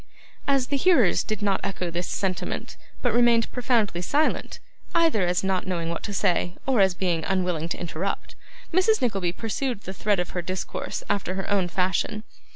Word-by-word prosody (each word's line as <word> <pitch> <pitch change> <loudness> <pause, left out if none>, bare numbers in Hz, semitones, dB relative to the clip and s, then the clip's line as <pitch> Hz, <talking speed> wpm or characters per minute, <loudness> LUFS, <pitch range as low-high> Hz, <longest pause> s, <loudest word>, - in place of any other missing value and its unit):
As 275 -2 +3
the 280 - +1
hearers 275 - +4
did 215 -1 -3
not 200 -2 +2
echo 185 -3 -2
this 175 +1 -2
sentiment, 190 -2 -3 0.3
but 245 -3 +2
remained 235 -1 +4
profoundly 230 -8 +1
silent, 290 - 0 0.4
either 320 - +3
as 180 +1 +1
not 190 -1 0
knowing 170 -3 -1
what 170 - -3
to - - -4
say, 180 -3 +1
or 260 -6 +3
as 190 -2 +4
being 175 -3 0
unwilling 180 -4 0
to - - -3
interrupt, 175 +3 -3 0.4
Mrs. 400 +5 +4
Nickleby 195 -8 0
pursued 225 +3 -2
the 190 - -6
thread 200 0 +1
of 180 - -2
her 180 - -2
discourse 185 +1 -4
after 195 -2 -1
her 190 - -3
own 195 -3 +2
fashion. 185 +4 0
195 Hz, 175 wpm, -25 LUFS, 180-235 Hz, 0.4 s, hearers